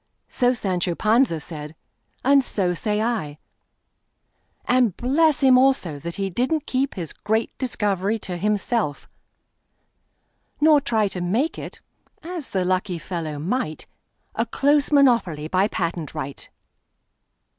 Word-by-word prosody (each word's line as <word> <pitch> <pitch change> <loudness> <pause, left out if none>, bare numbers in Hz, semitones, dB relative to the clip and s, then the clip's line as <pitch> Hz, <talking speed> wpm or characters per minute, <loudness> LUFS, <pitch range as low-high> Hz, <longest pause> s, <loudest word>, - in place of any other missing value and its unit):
So 245 -1 +2
Sancho 185 -7 -1
Panza 215 -5 +2
said, 150 -1 -7 0.5
and 275 0 +5
so 185 -7 +1
say 210 +4 -1
I:And 225 +4 -4
bless 295 +4 +2
him, 260 -2 +6
also, 255 - +2
that 170 +3 -5
he 195 -1 -2
did 240 - -1
n't 315 -3 0
keepHis 255 - -2
great 220 +2 0
discovery 210 -4 0
to 185 -4 -6
himself; 210 - -1 1.5
nor 300 -1 +5
tryTo 215 -8 0
make 230 - 0
it—as 335 -3 -10
the 185 -2 -1
lucky 185 0 0
fellow 165 -2 -5
might—A 190 - -5
close 285 +4 +2
monopoly 235 - +3
by 185 +4 +2
patent 170 -6 -3
right! 140 +1 -6
210 Hz, 115 wpm, -23 LUFS, 175-255 Hz, 1.5 s, him